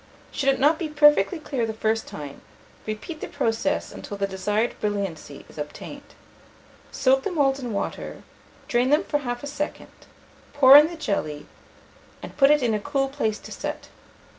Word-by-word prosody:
Should 275 - 0
it 270 - +2
not 300 +3 +3
be 325 - -3
perfectly 295 - +4
clear 270 -6 -3
the 220 - -3
first 220 0 -1
time, 145 -2 -8 0.5
repeat 220 - -6
the - - -4
process 230 -5 -1
until 205 - -8
the 200 - 0
desired 205 +4 -1
brilliancy 195 -9 -4
is - - -13
obtained. 285 - -8 0.8
Soak 265 0 +3
the 400 - -3
moulds 280 -5 +2
in 245 -3 -5
water, 200 - -4 0.4
drain 245 +1 +2
them 300 +5 +3
for 295 -6 -1
half 245 -2 -4
a - - -4 0.2
second, 300 - -4 0.6
pour 275 -2 +8
in 300 +1 +9
the 340 - -7
jelly, 155 - -3 0.8
and - - -9
put 275 -1 +5
it 295 -2 +4
in 235 -2 +2
a 210 - 0
cool 275 +3 -1
place 220 -6 -1
to - - -12
set. - - -6
260 Hz, 175 wpm, -24 LUFS, 210-290 Hz, 0.8 s, in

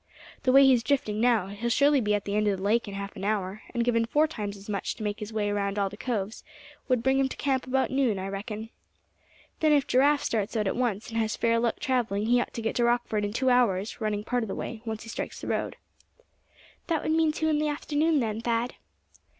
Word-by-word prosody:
"The 255 - +2
way 275 +1 +8
he's 255 -3 +5
drifting 220 -4 0
now, 235 -5 +3
he'll 210 +4 -3
surely 280 +3 +4
be 210 -1 +1
at 205 - -3
the 200 - -2
end 210 0 +2
of 200 -2 +1
the 190 - -7
lake 225 +3 +2
in 200 - -6
half 200 0 -6
an 190 - -7
hour; 200 0 -1
and 235 -1 0
given 230 -1 +2
four 300 +6 +3
times 210 -10 -5
as 195 - -14
much 200 -3 -2
to 220 - -7
make 205 0 -2
his 210 +1 -6
way 210 -2 -1
round 200 0 -1
all 200 -1 +1
the - - -8
coves, 220 -1 -3 0.4
would 250 -3 +1
bring 265 +1 +3
him 270 -1 +2
to - - -7
camp 265 -2 0
about 265 +1 +1
noon, 260 -6 +1
I 190 +1 -4
reckon. 210 +3 -6 0.9
Then, 310 -1 +4
if 285 -2 +3
Giraffe 280 +3 +3
starts 220 +1 -1
out 210 - 0
at 195 - 0
once, 235 -4 -1
and 225 0 -2
has 220 -1 0
fair 230 0 +2
luck 235 0 0
traveling 230 -6 0
he 245 +2 +3
ought - - -4
to 230 - -4
get 225 - -1
to 240 - +2
Rockford 235 -3 +1
in 205 - -1
two 260 +4 +1
hours, 220 -4 +1
running 210 -1 -1
part 245 +2 -1
of - - -4
the 195 - -4
way, 225 - -5
once 220 -1 -4
he 230 - -10
strikes - - -5
the - - -8
road." - - -2 1.1
"That 330 -3 0
would - - 0
mean 320 -1 +3
two 315 +1 -1
in 300 -1 +2
the 305 - +1
afternoon, 295 +1 +1
then, 220 -1 -2
Thad?" 235 +1 -1
230 Hz, 250 wpm, -27 LUFS, 210-260 Hz, 1.1 s, way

